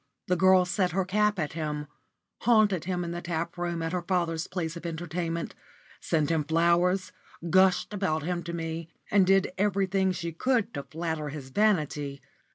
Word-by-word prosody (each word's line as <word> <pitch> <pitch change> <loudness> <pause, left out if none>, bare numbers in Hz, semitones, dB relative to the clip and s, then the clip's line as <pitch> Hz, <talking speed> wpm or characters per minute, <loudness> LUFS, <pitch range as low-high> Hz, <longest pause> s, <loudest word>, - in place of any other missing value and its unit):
The 180 - +1
girl 185 0 +5
set 180 0 0
her 190 0 +1
cap 210 +2 +2
at 155 -4 -2
him, 150 -2 -3 0.5
haunted 215 -7 +3
him 180 -1 -1
in 170 - -4
the 175 0 -4
tap 170 0 -3
room 175 -2 -2
at 165 - -2
her 180 - 0
father's 170 -3 -1
place 175 -3 -3
of 170 - -8
entertainment, 170 0 -3 0.5
sent 155 -1 0
him 160 -2 +1
flowers, 170 +4 +2 0.4
gushed 190 +1 +4
about 180 -7 -1
him 175 +1 -2
to 170 - -5
me, 165 -1 -4 0.2
and 195 -2 +5
did 195 -1 +3
everything 195 -1 +2
she 170 -2 -4
could 235 +6 0
to 140 - -3
flatter 160 0 -4
his 140 -2 -8
vanity. 150 -8 +1
175 Hz, 170 wpm, -28 LUFS, 160-190 Hz, 0.5 s, girl